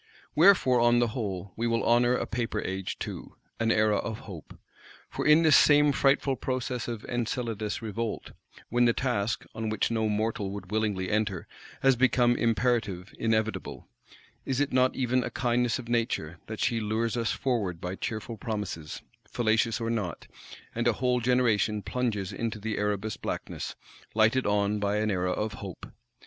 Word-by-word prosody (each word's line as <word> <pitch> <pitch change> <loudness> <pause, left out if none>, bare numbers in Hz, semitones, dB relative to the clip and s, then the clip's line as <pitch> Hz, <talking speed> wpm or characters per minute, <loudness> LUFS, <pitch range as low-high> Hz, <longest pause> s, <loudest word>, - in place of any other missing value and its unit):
Wherefore, 155 -7 +5
on 120 0 +4
the 120 -1 +2
whole, 100 -5 -4
we 115 +1 -1
will 115 0 +1
honour 120 +1 +4
a - - -1
Paper 115 0 -2
Age 95 0 -4
too; - - -7 0.2
an 115 0 +2
Era 110 -1 +3
of 110 +2 -4
hope! 95 - -10 0.5
For - - -2
in 155 +2 +6
this 155 -2 +6
same 145 0 +6
frightful 135 -1 +2
process 125 -1 -3
of 115 -2 -5
Enceladus 115 -3 -3
Revolt; 110 +1 -4 0.4
when 120 +1 +3
the 120 - +4
task, 115 -5 -1
on 110 0 -3
which 110 +2 0
no 110 -1 +1
mortal 105 -1 -1
would 100 -1 -7
willingly 105 -4 -1
enter, 105 -4 -1 0.4
has 135 -1 +5
become 120 -1 +3
imperative, 115 -5 0
inevitable,—is 110 +3 -3
it 145 -2 0
not 130 0 +3
even 125 -1 +1
a 125 - -3
kindness 120 0 +1
of 125 -3 -8
Nature 115 -9 -1
that 110 -1 -6
she 120 -4 +1
lures 110 +1 -1
us 115 -2 0
forward 105 -10 -1
by 90 +1 -4
cheerful 110 +3 -5
promises, 100 -8 -5 0.3
fallacious 115 0 +1
or 115 0 -1
not; 100 -9 -3 0.5
and - - 0
a - - +4
whole 125 -1 +1
generation 115 -4 +2
plunges 105 -5 -2
into 115 -2 -3
the 110 +1 -3
Erebus 105 +1 -1
Blackness, - - -5 0.4
lighted 110 +3 +3
on 105 0 +1
by 100 0 0
an 110 0 +1
Era 90 -1 0
of 105 +3 -2
Hope? 95 -3 -8
115 Hz, 165 wpm, -28 LUFS, 105-120 Hz, 0.5 s, in